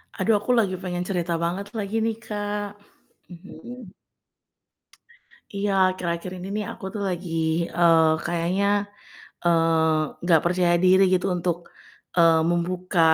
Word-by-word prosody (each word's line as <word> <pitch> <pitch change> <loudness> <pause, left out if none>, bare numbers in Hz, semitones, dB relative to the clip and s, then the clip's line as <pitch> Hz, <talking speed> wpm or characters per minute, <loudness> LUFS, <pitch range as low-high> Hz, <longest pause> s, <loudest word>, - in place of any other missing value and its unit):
Aduh, 215 +2 +1
aku 210 - -2
lagi 200 -4 +1
pengen 180 -1 -3
cerita 175 -3 -1
banget 180 +4 -2
lagi 205 0 -3
nih, 225 - -1
Kak. 205 -1 -3 0.6
Mhm. 195 +5 -11 1.6
Iya, 200 0 -1 0.2
akhir-akhir 180 -1 -3
ini 180 +1 -7
nih 210 - -2
aku - - -9
tuh 210 - -4
lagi, 180 -1 -5 0.5
eee, 165 -2 +5 0.2
kayaknya, 175 +3 0 0.8
eee, 160 -2 +1
nggak 170 -2 +4
percaya 175 0 +2
diri 185 +1 +6
gitu 180 - 0
untuk, 175 -1 -1 0.6
eee, 165 -2 +5
membuka, 175 +1 -1
180 Hz, 125 wpm, -24 LUFS, 170-200 Hz, 1.6 s, diri